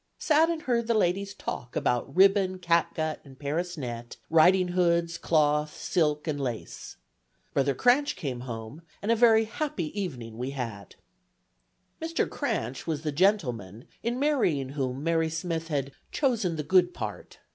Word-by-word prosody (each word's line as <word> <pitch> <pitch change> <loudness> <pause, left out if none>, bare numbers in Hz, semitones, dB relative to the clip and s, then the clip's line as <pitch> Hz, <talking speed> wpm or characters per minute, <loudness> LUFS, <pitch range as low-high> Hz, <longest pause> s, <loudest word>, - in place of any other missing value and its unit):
Sat 315 +1 +3
and 330 -2 -2
heard 235 -2 0
the 235 - +2
ladies 195 0 +1
talk 120 - -6
about 125 +3 0
ribbon, 190 0 +4
catgut, 170 -3 0
and 135 -2 -15
Paris 165 +5 -3
net, 120 -4 -6
ridinghoods, 175 0 +3
cloth, 150 -1 +2
silk 150 -3 0
and 145 -2 -1
lace. 120 -4 -5 0.6
Brother 140 -1 +1
Cranch 255 - +3
came 130 -5 -4
home, 115 +3 -7 0.2
and 215 - +1
a - - +5
very 225 -1 +5
happy 235 - -3
evening 120 - -6
we 130 +2 -3
had." 105 -6 -6 1.1
Mr. 330 +1 0
Cranch - - -3
was 155 -2 -2
the 150 - -1
gentleman 125 - 0 0.2
in 240 +1 -1
marrying 235 - +1
whom 135 -1 -3
Mary 165 0 +1
Smith 165 0 -3
had 140 -3 -2 0.2
"chosen 230 - +1
the 150 - -3
good 180 +2 +3
part." 105 -1 -6
165 Hz, 145 wpm, -28 LUFS, 135-195 Hz, 1.1 s, a